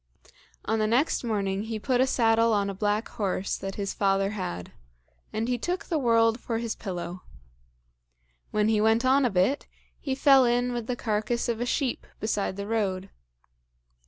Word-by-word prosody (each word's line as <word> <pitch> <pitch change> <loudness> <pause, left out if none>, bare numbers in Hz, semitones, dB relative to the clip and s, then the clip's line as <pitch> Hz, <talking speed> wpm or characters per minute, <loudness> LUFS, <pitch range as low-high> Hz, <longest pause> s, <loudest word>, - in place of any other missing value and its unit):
On 220 +1 0
the 215 - +2
next 255 +8 +1
morning 200 -3 -1
he 225 0 -3
put 250 +3 +1
a 260 - +3
saddle 230 -2 +3
on 200 -1 +1
a - - -6
black 205 +3 0
horse 195 -3 -2
that 195 0 -5
his 200 -1 -3
father 195 0 +1
had, 90 - -5 0.6
and 220 +2 -2
he 245 -1 0
took 360 - -2
the 325 -4 -1
world 230 -2 +3
for 230 -1 -3
his 230 -1 -2
pillow. 180 -2 -5 1.3
When 210 0 +1
he 215 -1 +2
went 225 +3 +3
on 265 +1 +4
a - - +3
bit, 195 +8 +1 0.3
he 265 -2 -2
fell 270 -1 +6
in 245 0 +1
with 240 -2 -4
the 250 - -1
carcass 225 +1 -1
of 235 -1 -2
a 245 - -1
sheep 260 -1 -1
beside 210 -3 -1
the 200 - -4
road. 195 -3 -2
225 Hz, 180 wpm, -27 LUFS, 200-245 Hz, 1.3 s, fell